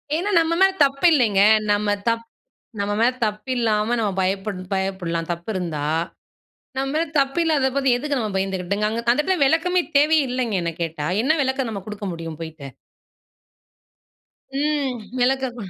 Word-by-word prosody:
ஏன்னா, 355 +6 -1
நம்ம 330 0 +1
மேல 385 0 +6
தப்பு 275 +4 -1
இல்லைங்க. 220 -9 +3 0.3
நம்ம 205 0 +1 0.2
தப் 230 0 -1 0.5
நம்ம 200 +1 -1
மேல 240 +2 +4
தப்பு 210 +3 -4
இல்லாம 220 0 +1
நம்ம 210 -3 0
பயப்படணும் 190 0 -3
பயப்படலாம் 180 -4 -2
தப்பு 170 +5 -6
இருந்தா. 160 -5 -3 0.9
நம்ம 270 +1 0
மேல 330 +1 +1
தப்பு 275 +4 0
இல்லாத 290 -5 +2
போது 275 -1 +2
எதுக்கு 285 +1 -2
நம்ம 215 -3 -2
பயந்துக்கிட்டுங்க? 195 +2 -1
அங்க 225 +2 -2
அந்த 250 - +1
இடத்துல 375 +2 0
விளக்கமே 350 +5 +2 0.2
தேவையே 305 +1 +4
இல்லைங்க. 245 -4 -1
என்ன 170 - -1
கேட்டா, 155 -2 -3 0.2
"என்ன 310 +4 +3
விளக்கம் 265 -2 -1
நம்ம 200 -2 -5
கொடுக்க 210 -1 -6
முடியும் 165 -2 -7
போய்ட்டு?" 160 -3 -8 1.9
ம். 290 -4 0 0.2
விளக்கம் 260 -1 +1
225 Hz, 155 wpm, -22 LUFS, 190-275 Hz, 1.9 s, மேல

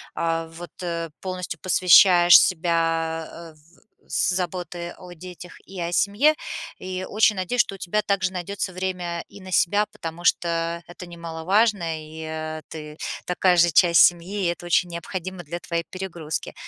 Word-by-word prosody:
а, 165 0 -1
вот, 170 +2 -11
э, 170 -2 -3
полностью 180 -4 -5
посвящаешь 180 -1 +7
себя, 165 -2 0
э, 165 -1 -11
в 155 +3 -26 0.2
с - - +1
заботы 175 -1 -3
о 180 -1 -11
детях 180 +1 -11
и 190 -2 -8
о 170 - -2
семье. 210 - +3 0.4
И 185 0 -5
очень 215 0 +3
надеюсь, 210 +7 +2
что - - -4
у - - -8
тебя 210 +4 -1
также 190 -2 0
найдется 185 +1 -4
время 180 -2 -4
и 200 - -13
на 185 0 -10
себя, 205 +4 +2
потому 170 -5 -8
что 170 0 0
это 175 +1 -11
немаловажно, 170 +2 0
и, 155 +1 -10
э, 155 0 -5
ты 150 -1 -9 0.3
такая 180 0 +2
же 170 0 +5
часть 170 +2 +5
семьи, 180 +3 +2
и - - +2
это 175 0 -8
очень 175 +1 +2
необходимо 180 +2 -6
для 170 +3 -6
твоей 170 -1 -3
перегрузки. 175 -5 -5
175 Hz, 160 wpm, -23 LUFS, 165-185 Hz, 0.4 s, посвящаешь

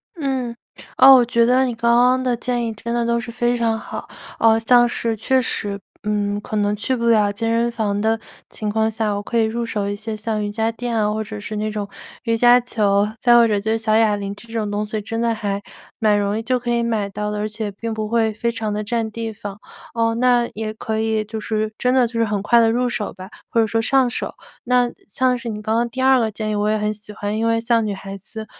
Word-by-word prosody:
嗯， 265 -6 -2 0.4
哦， 265 +1 +9
我 245 -2 +5
觉 235 0 +2
得 255 +2 +4
你 245 - -2
刚 235 +1 +1
刚 250 +1 +4
的 245 -2 0
建 240 0 -1
议， - - -2
真 235 +2 -5
的 235 -1 0
都 235 0 +1
是 235 0 -6
非 240 0 0
常 230 -1 +1
好。 - - -7 0.3
啊， 225 0 +4
像 240 +1 +5
是 230 -1 -1
确 260 +4 +2
实 205 -3 -2 0.2
嗯， 205 -1 -1
可 215 - -6
能 205 0 +1
去 235 +5 -1
不 235 -1 -2
了 210 -3 +4
健 225 +2 -2
身 235 +1 +1
房 210 -3 -1
的 220 +1 +1 0.3
情 210 -1 -4
况 220 +1 +1
下， 215 -2 -1
我 205 - -4
可 235 - -1
以 225 - +4
入 235 +2 -2
手 205 -3 -2
一 205 - -2
些 220 +1 -5
像 215 0 -2
瑜 205 - -3
伽 225 +2 0
垫 235 0 -4
啊， 210 -1 +1
或 220 0 -2
者 215 0 -7
是 210 +1 -6
那 215 +1 -2
种 205 -1 -4 0.4
瑜 230 -1 +1
伽 245 +1 +6
球， 205 -4 +1
再 240 -1 +5
或 235 -1 +6
者 205 -2 +1
就 220 +2 -2
是 225 - +2
小 220 -1 +1
哑 220 -2 +4
铃 200 0 -5
这 230 +2 -15
种 215 -2 -1
东 205 +1 -2
西， 215 0 -4
真 225 +2 -4
的 230 -1 +1
还 200 -2 -3 0.4
蛮 210 -2 +3
容 205 +1 0
易 225 - -3
就 250 +1 0
可 240 0 -5
以 235 0 +1
买 220 -3 0
到 210 +1 -3
的， 210 - -3
而 210 - -1
且 215 -1 -4
并 225 +3 -5
不 215 -1 -3
会 225 -2 +1
非 235 +2 -1
常 220 -2 -3
地 210 0 -2
占 225 0 -1
地 225 0 -4
方。 205 -2 -8 0.4
哦， 230 -1 +1
那 245 0 +3
也 215 0 -4
可 220 0 -3
以 220 -1 0
就 220 +1 -6
是 215 0 -2
真 250 0 +1
的 255 -2 +4
就 230 - -6
是 230 - +3
很 205 -2 -1
快 235 +2 +5
地 225 -1 +4
入 245 +2 +1
手 215 -3 -3
吧， 185 +1 -10 0.2
或 230 - +1
者 - - +3
说 225 +1 0
上 260 +1 +3
手。 - - -4 0.3
那 245 0 +3 0.2
像 250 +4 +1
是 235 - -7
你 210 -1 -4
刚 220 +1 -1
刚 235 0 0
第 260 +3 -5
二 265 -1 +5
个 225 -2 +1
建 215 +1 -3
议， 210 - -1
我 205 +1 +1
也 215 - +2
很 210 0 -1
喜 210 0 -13
欢， 205 +1 -3
因 225 +1 0
为 230 0 +1
像 230 -1 +2
女 205 - -2
孩 195 0 -7
子， 220 +3 -8
225 Hz, 285 characters per minute, -21 LUFS, 210-235 Hz, 0.4 s, 哦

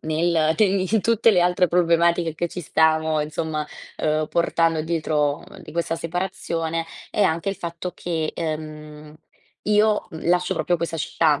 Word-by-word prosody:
nel 160 0 +1
te 215 - +5
in 195 +2 +1
tutte 230 0 +4
le 185 -4 +3
altre 180 +1 +3
problematiche 170 -1 +2
che 175 +2 -2
ci 180 - -6
stiamo, 160 0 +2
insomma, 155 0 -2 0.3
uhm, 155 0 +1
portando 165 -1 +1
dietro 155 -2 0 0.2
di - - -11
questa 170 0 -1
separazione, 165 -2 -3 0.3
è 210 - +1
anche 170 +2 +1
il - - -4
fatto 170 0 -5
che, 160 -4 -2
uhm, 155 -1 -6 0.5
io, 210 -1 +3
mhmm, 160 -1 -5
lascio 180 0 +2
proprio 175 - +1
questa 165 0 -3
città, 155 -1 +1
165 Hz, 155 wpm, -23 LUFS, 155-180 Hz, 0.5 s, te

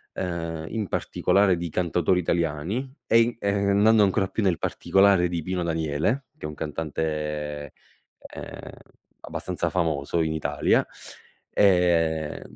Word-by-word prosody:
ehm, 85 -3 -4
in 110 -3 -3
particolare 95 0 +2
di 85 0 -3
cantautori 90 +1 +1
italiani 85 - -1 0.2
e 115 - +5
i 115 +1 +1
ehm, 100 -1 0
andando 110 +1 +5
ancora 95 -1 +2
più 110 - -2
nel 90 -4 +2
particolare, 95 -2 +3
di 85 -2 -3
Pino 90 0 -2
Daniele, 80 - -1
che - - -6
è - - -4
un 75 - -7
cantante, 75 -2 -4 0.6
ehm, - - -8 0.5
abbastanza - - -3
famoso 80 -2 0
in 80 -1 -1
Italia, 80 - +1 0.7
ehm, 85 -5 +2
85 Hz, 130 wpm, -25 LUFS, 80-100 Hz, 0.7 s, e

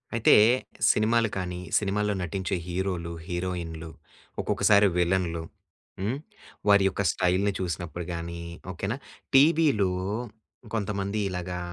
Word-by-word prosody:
అయితే 115 - +5 0.6
సినిమాలు 115 +1 +2
కానీ 90 -1 -3 0.2
సినిమాల్లో 105 0 0
నటించే 90 +1 -2
హీరోలు, 90 -2 -2 0.2
హీరోయిన్‌లు, 85 -3 -4 0.5
ఒక్కొక్కసారి 100 -1 +4
విలన్‌లు. 85 -2 +1 0.6
హ్మ్, 105 +7 -1 0.5
వారి 100 -1 +6
యొక్క 95 - -3
స్టైల్‌ని 95 +3 +1
చూసినప్పుడు 85 -1 -4
గాని, 85 0 -5 0.3
ఓకే 90 +2 -5
నా! 120 - -2 0.4
టీవీలో 140 - +5 0.8
కొంతమంది 100 -1 -2
ఇలాగా 90 -1 -4
95 Hz, 100 wpm, -27 LUFS, 85-105 Hz, 0.8 s, వారి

